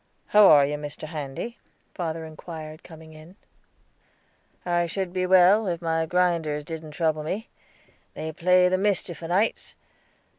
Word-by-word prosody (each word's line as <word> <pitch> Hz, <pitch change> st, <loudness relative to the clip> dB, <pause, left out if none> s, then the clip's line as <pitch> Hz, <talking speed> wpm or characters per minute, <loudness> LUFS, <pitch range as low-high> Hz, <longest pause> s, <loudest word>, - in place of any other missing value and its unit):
"How 210 Hz, -1 st, +7 dB
are 145 Hz, -2 st, +7 dB
you, 150 Hz, +1 st, -3 dB
Mr. 145 Hz, 0 st, -7 dB
Handy?" 155 Hz, -, -6 dB, 0.3 s
father 165 Hz, -2 st, -4 dB
inquired, 155 Hz, 0 st, -9 dB
coming 160 Hz, -2 st, -13 dB
in. 155 Hz, +4 st, -14 dB, 1.3 s
"I 175 Hz, -1 st, +1 dB
should 180 Hz, +1 st, -3 dB
be 185 Hz, -1 st, -1 dB
well, 190 Hz, +3 st, +5 dB
if 170 Hz, -2 st, -2 dB
my 165 Hz, -1 st, -1 dB
grinders 165 Hz, -4 st, 0 dB
didn't 160 Hz, 0 st, -7 dB
trouble 155 Hz, -1 st, 0 dB
me; 195 Hz, +9 st, -5 dB, 0.7 s
they 160 Hz, -, -5 dB
play 180 Hz, +3 st, +3 dB
the 185 Hz, +1 st, +1 dB
mischief 190 Hz, -5 st, -1 dB
o'nights. 180 Hz, +7 st, -1 dB
165 Hz, 140 wpm, -25 LUFS, 155-180 Hz, 1.3 s, How